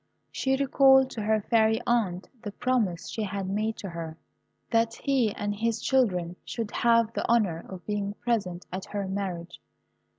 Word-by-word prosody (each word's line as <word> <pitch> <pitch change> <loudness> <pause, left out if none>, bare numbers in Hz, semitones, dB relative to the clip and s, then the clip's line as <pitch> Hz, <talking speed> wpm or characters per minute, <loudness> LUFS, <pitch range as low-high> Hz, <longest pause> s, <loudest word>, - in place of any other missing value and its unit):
She 265 0 +1
recalled 265 -1 +5
to 225 - -5
her 215 +1 +2
fairy 220 0 +3
aunt 200 -7 0
the 205 - -5
promise 220 -7 0
she 225 - -4
had 200 -2 -3
made 215 +3 -1
to 195 - -6
her, 165 -2 -6 0.5
that 230 0 +2
he 265 -6 +1
and 205 0 -2
his 230 +2 0
children 180 -10 +1
should 225 -3 -4
have 230 -1 +3
the - - -2
honour 200 -8 +2
of 185 -2 -9
being 205 -1 -2
present 195 -8 -2
at 185 +1 -4
her 200 -2 -4
marriage. 185 -3 -4
210 Hz, 165 wpm, -27 LUFS, 190-235 Hz, 0.5 s, recalled